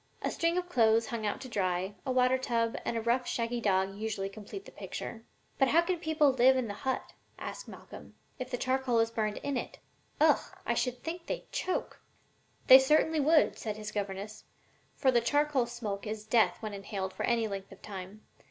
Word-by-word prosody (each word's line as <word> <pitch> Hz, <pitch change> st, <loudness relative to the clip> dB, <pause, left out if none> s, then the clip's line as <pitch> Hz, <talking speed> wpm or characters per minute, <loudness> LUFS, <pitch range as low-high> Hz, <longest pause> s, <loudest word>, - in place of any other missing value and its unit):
A -, -, 0 dB
string 335 Hz, 0 st, +1 dB
of 360 Hz, 0 st, -1 dB
clothes 230 Hz, -6 st, +3 dB
hung 220 Hz, -1 st, -3 dB
out 205 Hz, -, -2 dB
to 260 Hz, -, -7 dB
dry, 190 Hz, -3 st, -1 dB
a -, -, +1 dB
water 255 Hz, 0 st, +3 dB
tub 230 Hz, -3 st, 0 dB
and 235 Hz, -, -1 dB
a -, -, -1 dB
rough, 240 Hz, +2 st, +1 dB
shaggy 235 Hz, 0 st, -1 dB
dog 190 Hz, -2 st, +1 dB
usually 210 Hz, -2 st, -3 dB
complete 215 Hz, -, -9 dB
the -, -, -12 dB
picture.'" 225 Hz, -1 st, -7 dB, 0.4 s
"But 270 Hz, -, +5 dB
how 330 Hz, +6 st, +4 dB
can 360 Hz, -1 st, -1 dB
people 315 Hz, -3 st, +3 dB
live 260 Hz, +1 st, +5 dB
in 255 Hz, -3 st, -1 dB
the 205 Hz, -, -4 dB
hut," 260 Hz, +5 st, -3 dB, 0.2 s
asked -, -, -7 dB
Malcolm, -, -, -12 dB, 0.2 s
"if 255 Hz, 0 st, -4 dB
the 245 Hz, -, -2 dB
charcoal 255 Hz, -1 st, +1 dB
is 225 Hz, 0 st, +2 dB
burned 215 Hz, -2 st, -1 dB
in 280 Hz, -2 st, -1 dB
it? -, -, -5 dB, 0.4 s
Ugh! -, -, +5 dB, 0.3 s
I -, -, +1 dB
should 250 Hz, -1 st, -2 dB
think 335 Hz, +1 st, -5 dB
they'd -, -, -5 dB
choke." 370 Hz, -, -3 dB, 0.6 s
"They 260 Hz, 0 st, +11 dB
certainly 310 Hz, +3 st, +3 dB
would," 305 Hz, +2 st, +4 dB
said 215 Hz, -2 st, -4 dB
his 215 Hz, 0 st, -6 dB
governess; 205 Hz, +1 st, -5 dB, 0.5 s
"for 265 Hz, -, +3 dB
the 240 Hz, -2 st, +3 dB
charcoal 290 Hz, -1 st, +2 dB
smoke 220 Hz, -4 st, -5 dB
is 215 Hz, 0 st, -5 dB
death 215 Hz, -4 st, +3 dB
when 215 Hz, -1 st, -4 dB
inhaled 195 Hz, -1 st, -4 dB
for -, -, -7 dB
any 230 Hz, -2 st, +1 dB
length 195 Hz, -1 st, -6 dB
of 195 Hz, -, -14 dB
time. 195 Hz, +1 st, -8 dB
235 Hz, 200 wpm, -31 LUFS, 210-265 Hz, 0.6 s, They